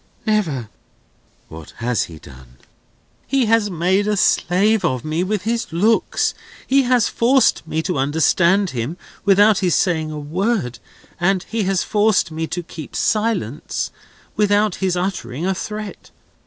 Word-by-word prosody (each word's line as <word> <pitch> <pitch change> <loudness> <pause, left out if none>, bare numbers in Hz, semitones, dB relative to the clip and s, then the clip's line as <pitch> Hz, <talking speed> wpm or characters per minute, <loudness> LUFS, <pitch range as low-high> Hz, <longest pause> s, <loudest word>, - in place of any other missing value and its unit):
Never." 170 - 0 0.8
"What 80 -1 -11
has 120 -1 0
he 80 - -11
done?" 65 -4 -15 0.7
"He 270 -3 +2
has 225 -1 +2
made 185 +3 +1
a 210 -1 +1
slave 200 +4 +2
of 130 -4 -1
me 155 +3 -1
with 200 0 -2
his 230 +2 -1
looks. 210 +7 +1 0.3
He 275 +1 +4
has 250 -3 +4
forced 245 -7 +2
me 160 +1 -2
to 175 -5 -2
understand 170 +7 +2
him, 125 +7 -4 0.3
without 205 +1 +5
his 180 -4 +1
saying 160 -4 +1
a 155 - -6
word; 155 - -2 0.4
and 185 +1 +1
he 220 -1 -2
has 190 -1 +1
forced 210 -5 +2
me 160 +1 -3
to 175 +1 -4
keep 160 -3 -10
silence, 210 - -1 0.4
without 205 -1 +2
his 185 -2 0
uttering 175 -6 -3
a 190 - +1
threat. 210 +2 -7
185 Hz, 145 wpm, -20 LUFS, 155-210 Hz, 0.8 s, without